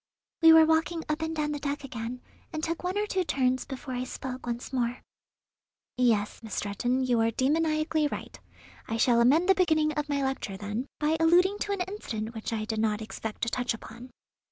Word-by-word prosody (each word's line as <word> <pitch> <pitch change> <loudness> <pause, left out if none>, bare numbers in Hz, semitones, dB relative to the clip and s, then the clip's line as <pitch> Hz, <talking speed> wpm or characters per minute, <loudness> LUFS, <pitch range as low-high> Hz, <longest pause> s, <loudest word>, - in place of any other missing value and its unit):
We 325 0 +9
were 320 0 +8
walking 320 +1 +1
up 305 +1 -1
and 320 0 -2
down 300 -1 -1
the 295 - -3
deck 285 0 -3
again, 245 -1 -6 0.3
and 315 -1 -4
took 330 +1 -2
one 365 +2 -1
or 415 - +1
two 380 -3 0
turns 260 -5 0
before 265 -1 -6
I 250 0 -2
spoke 255 0 -6
once 240 +2 -4
more. 245 -1 -1 0.9
"Yes, 230 -5 +1
Miss 220 -2 -6
Stretton, 245 +6 0
you 245 -2 +2
are 225 - +3
demoniacally 310 +4 +1
right. - - -7 0.5
I 225 - -2
shall 235 0 +4
amend 300 +9 +4
the 385 - +7
beginning 315 -5 +2
of 295 0 -3
my 280 -1 0
lecture, 265 -7 -3
then, 210 +6 -4
by 310 +1 +2
alluding 360 +5 +4
to 405 - -2
an 395 - -2
incident 235 - -4
which 220 0 -5
I 215 -1 -2
did 220 0 -2
not 215 -1 +1
expect 220 0 -6
to 230 - +1
touch 250 0 -1
upon. 235 +3 -11
265 Hz, 205 wpm, -28 LUFS, 235-320 Hz, 0.9 s, We